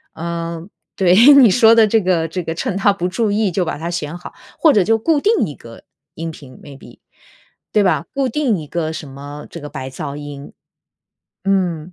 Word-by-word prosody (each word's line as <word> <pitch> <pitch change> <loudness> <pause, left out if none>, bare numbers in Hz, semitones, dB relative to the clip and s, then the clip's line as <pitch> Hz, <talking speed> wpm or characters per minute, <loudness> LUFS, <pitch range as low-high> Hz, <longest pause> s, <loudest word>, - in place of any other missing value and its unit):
嗯， 170 +1 -5 0.3
对， 180 -2 +3 0.2
你 265 -5 +7
说 225 +2 +6
的 225 -1 +5
这 225 +2 +3
个 180 -4 0
这 180 +3 -5
个 165 - -4
趁 195 +4 -3
它 200 +1 +3
不 180 -2 -3
注 215 +3 -1
意 210 0 +1
就 180 +1 -1
把 160 - -4
它 165 +2 -4
选 155 -2 -4
好， 175 - -10 0.3
或 320 - +5
者 205 -8 +3
就 225 +4 +1
固 310 +6 +1
定 430 +8 +1
一 145 - -8
个 115 -1 -14 0.3
音 165 +1 -5
频 140 -4 -14
maybe。 140 -1 -13 0.8
对 210 - +4
吧？ 185 - +1
固 270 -2 0
定 250 -4 0
一 150 - -9
个 160 0 -3
什 155 -2 -8
么 145 +2 -10
这 170 - -9
个 150 - -8
白 135 -2 -7
噪 140 +1 -6
音， 145 -1 -9 0.9
嗯。 180 -4 -1
175 Hz, 235 characters per minute, -18 LUFS, 155-210 Hz, 0.9 s, 你